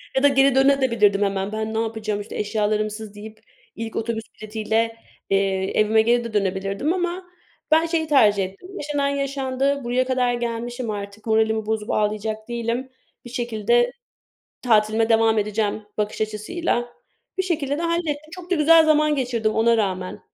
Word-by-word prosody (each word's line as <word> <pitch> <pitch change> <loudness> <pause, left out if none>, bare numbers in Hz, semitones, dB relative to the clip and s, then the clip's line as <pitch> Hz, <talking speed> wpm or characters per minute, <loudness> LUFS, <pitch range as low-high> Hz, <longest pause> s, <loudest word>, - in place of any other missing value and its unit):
Ya 265 - +2
da - - +8
geri 275 -1 +4
döne 275 +1 +4
de 260 - +2
bilirdim 205 -3 +3
hemen 195 0 -1
ben 220 0 -3
ne 220 - 0
yapacağım 215 -2 -2
işte 205 - -9
eşyalarımsız 210 0 -2
deyip 215 +1 -10 0.4
ilk 225 -1 -6
otobüs 225 0 -2 0.2
bileti 215 +1 -6
ile, 225 +1 0 0.3
eee, 195 -1 +1
evime 220 +1 +4
geri 240 +1 +2
de 230 - -7
dönebilirdim. 200 - 0
Ama 360 0 -2 0.5
ben 320 +1 +5
şeyi 325 -1 -1
tercih 210 -9 +4
ettim 195 - -11
yaşanan 290 -1 -1
yaşandı, 275 0 -1
buraya 245 +2 +1
kadar 250 -1 +1
gelmişim 240 0 -3
artık 200 0 -7
moralimi 220 0 +2
bozup 215 -1 -2
ağlayacak 215 +1 -1
değilim 235 +2 -3 0.4
bir 240 - -8
şekilde 240 0 +1 0.7
tatilime 220 -1 +3
devam 225 -1 +4
edeceğim 210 0 -1 0.2
bakış 210 +1 -2
açısıyla. 240 +5 -2 0.5
Bir - - +3
şekilde 300 -6 -1
de 335 - -3
hallettim. 315 -3 -2
Çok 360 -1 -10
da 370 - +4
güzel 325 +1 +6
zaman 305 -1 +3
geçirdim 240 -5 0
ona 230 +1 +3
rağmen 185 -3 -2
225 Hz, 160 wpm, -23 LUFS, 215-275 Hz, 0.7 s, da